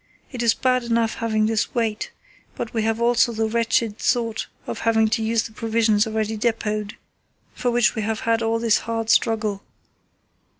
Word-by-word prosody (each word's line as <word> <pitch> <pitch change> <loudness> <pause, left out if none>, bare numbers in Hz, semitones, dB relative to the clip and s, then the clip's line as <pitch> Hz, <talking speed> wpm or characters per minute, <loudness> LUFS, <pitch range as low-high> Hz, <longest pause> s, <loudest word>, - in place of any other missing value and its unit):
It 250 -3 -5
is 230 -1 +3
bad 255 -1 +1
enough 230 -1 +1
having 215 -2 +1
this 220 +2 -1
wait, 225 -3 -1 0.5
but 225 - -5
we 225 - 0
have 225 +1 0
also 240 0 +3
the 220 0 0
wretched 230 -1 0
thought 230 -3 0 0.2
of - - -5
having 220 -1 +2
to 225 +1 0
use 225 +1 +1
the - - -8
provisions 220 -1 +1
already 220 0 -2
depot 215 -1 0
ed, 210 0 -7 0.6
for 250 - -1
which 240 -1 +3
we 220 - -3
have 215 +1 -2
had 230 0 +1
all 225 0 +1
this 230 -1 +2
hard 225 -1 -2
struggle." 215 -3 +1
225 Hz, 180 wpm, -22 LUFS, 220-230 Hz, 0.6 s, is